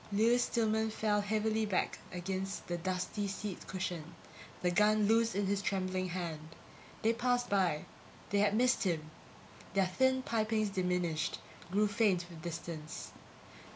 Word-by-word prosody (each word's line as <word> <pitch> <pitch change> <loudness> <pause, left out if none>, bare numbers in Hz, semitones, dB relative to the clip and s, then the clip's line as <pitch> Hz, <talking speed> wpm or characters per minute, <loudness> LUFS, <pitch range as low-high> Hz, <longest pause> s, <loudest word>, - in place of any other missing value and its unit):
Lewis 230 +4 +4
Stillman 220 -1 +1
fell 210 -1 +1
heavily 220 +1 +1
back 200 -4 0
against 190 +2 -3
the 175 - -2
dusty 185 +3 -2
seat 195 -1 -5
cushion, 175 -4 -4 0.5
the 180 - +3
gun 210 +3 +4
loose 225 +1 +3
in 200 0 +1
his 200 0 +1
trembling 185 -2 -1
hand. 165 -3 -5 0.5
They 220 - +4
had 230 +1 0
passed 245 -1 +1
by; 180 -6 +2 0.5
they 200 - +3
had 205 0 +3
missed 250 +2 +3
him. 160 -5 -1 0.6
Their 195 -1 +4
thin 260 +8 +2
pipings 215 -2 +1
diminished, 180 -4 0 0.3
grew 205 +3 +3
faint 200 -4 +2
with 165 -2 -10
distance. 160 -2 -6
200 Hz, 145 wpm, -33 LUFS, 180-215 Hz, 0.6 s, Lewis